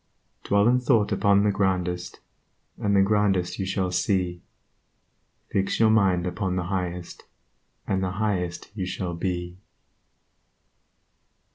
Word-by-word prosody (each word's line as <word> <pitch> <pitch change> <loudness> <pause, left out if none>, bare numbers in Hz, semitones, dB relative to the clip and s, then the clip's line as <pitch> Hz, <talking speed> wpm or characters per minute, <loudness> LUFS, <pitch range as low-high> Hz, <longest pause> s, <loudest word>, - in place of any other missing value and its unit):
Dwell 100 +1 +3
in 125 +1 +4
thought 120 -4 +2
upon 100 -1 +3
the 105 - +3
Grandest, 90 -2 -1 0.6
And 100 -1 +1
the 100 - +5
Grandest 100 -3 +1
you 95 - -2
shall 95 -1 -1
see; 90 -2 0 1.1
Fix 95 0 0
your 110 -1 +5
mind 95 -5 +3
upon 90 +1 -2
the 90 - -1
Highest, 90 -2 -4 0.6
And 95 -1 0
the 90 -1 -2
Highest 95 -5 -2
you 95 -4 -4
shall 90 -1 -3
be. 90 0 -4
95 Hz, 125 wpm, -25 LUFS, 90-100 Hz, 1.1 s, the